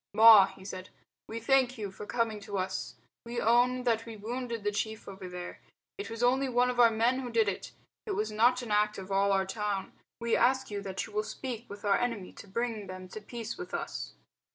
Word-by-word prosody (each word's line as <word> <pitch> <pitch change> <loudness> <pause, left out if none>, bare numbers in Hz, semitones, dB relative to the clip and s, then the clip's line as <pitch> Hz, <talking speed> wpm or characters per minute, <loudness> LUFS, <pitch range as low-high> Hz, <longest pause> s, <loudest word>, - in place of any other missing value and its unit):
"Ma," 220 -3 +10
he 190 - -13
said, 185 -1 -7 0.4
"we 225 - -5
thank 260 +1 +3
you 205 -3 -4
for 205 +2 -9
coming 230 -3 0
to 200 -1 -5
us. 190 0 -3 0.3
We 235 +1 -4
own 245 +2 +3
that 230 -2 +1
we 225 -1 -7
wounded 235 +1 -4
the 205 - +1
chief 220 +1 -3
over 190 -2 -8
there. 180 0 -7 0.3
It 200 +1 -6
was 230 +1 -4
only 260 +2 +3
one 250 0 +3
of 245 - -5
our 235 -1 +8
men 230 +3 +2
who 255 -2 -4
did 225 -2 +2
it. 200 - -3 0.4
It 410 - -1
was 215 0 -1
not 240 +4 +4
the 245 - -6
act 210 0 +2
of 190 0 -8
all 200 +1 +3
our 195 -1 +2
town. 200 -1 -3 0.3
We 235 -1 +1
ask 260 -1 +2
you 205 -1 -3
that 195 -1 -4
you 215 - -13
will 210 - +1
speak 240 +1 -6
with 205 +1 -9
our 200 -1 +4
enemy 230 -6 -2
to - - -12
bring 220 0 -2
them 185 0 -8
to 215 - -8
peace 230 - -6
with 360 - -5
us." - - -5
220 Hz, 225 wpm, -30 LUFS, 200-240 Hz, 0.4 s, Ma